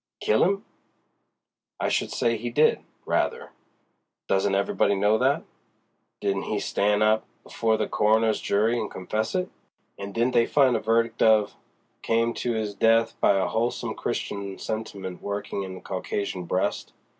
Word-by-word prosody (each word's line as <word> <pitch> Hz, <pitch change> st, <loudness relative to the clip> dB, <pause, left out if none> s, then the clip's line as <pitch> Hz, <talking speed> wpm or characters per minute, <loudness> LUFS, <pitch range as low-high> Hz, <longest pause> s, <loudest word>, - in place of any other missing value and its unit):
"Kill 110 Hz, -, +2 dB
'im? 195 Hz, +2 st, +1 dB, 1.1 s
I -, -, 0 dB
should -, -, 0 dB
say 115 Hz, -1 st, +1 dB
he 115 Hz, +2 st, -4 dB
did, 150 Hz, +6 st, +3 dB, 0.3 s
rather. -, -, -1 dB, 0.8 s
Doesn't 95 Hz, 0 st, +1 dB
everybody 100 Hz, 0 st, +1 dB
know 105 Hz, +3 st, +2 dB
that? 135 Hz, +3 st, +2 dB, 0.8 s
Didn't 100 Hz, -1 st, -1 dB
he 105 Hz, -, 0 dB
stan' 105 Hz, +1 st, +1 dB
up 110 Hz, 0 st, +2 dB, 0.2 s
before 110 Hz, -1 st, 0 dB
the -, -, -1 dB
coroner's 110 Hz, +1 st, +2 dB
jury 110 Hz, +4 st, +1 dB
and 110 Hz, -, -3 dB
confess 110 Hz, -, -3 dB
it? 185 Hz, 0 st, -1 dB, 0.5 s
And 100 Hz, 0 st, -6 dB
didn't 120 Hz, +4 st, 0 dB
they 115 Hz, -, +4 dB
find 135 Hz, -4 st, +4 dB
a -, -, +1 dB
verdict 115 Hz, +1 st, 0 dB
of 110 Hz, -2 st, +4 dB, 0.5 s
'Came 115 Hz, +1 st, +1 dB
to 120 Hz, -2 st, -1 dB
'is 110 Hz, -2 st, -2 dB
death 115 Hz, +2 st, +3 dB
by 100 Hz, -, +4 dB
a 95 Hz, -, +1 dB
wholesome 115 Hz, +2 st, -1 dB
Christian 100 Hz, -1 st, -4 dB
sentiment 100 Hz, -4 st, -5 dB
workin' 100 Hz, 0 st, -4 dB
in 95 Hz, -1 st, -7 dB
the 95 Hz, -, -10 dB
Caucasian 95 Hz, -1 st, -4 dB
breast'? 90 Hz, +2 st, -2 dB
110 Hz, 155 wpm, -25 LUFS, 100-115 Hz, 1.1 s, they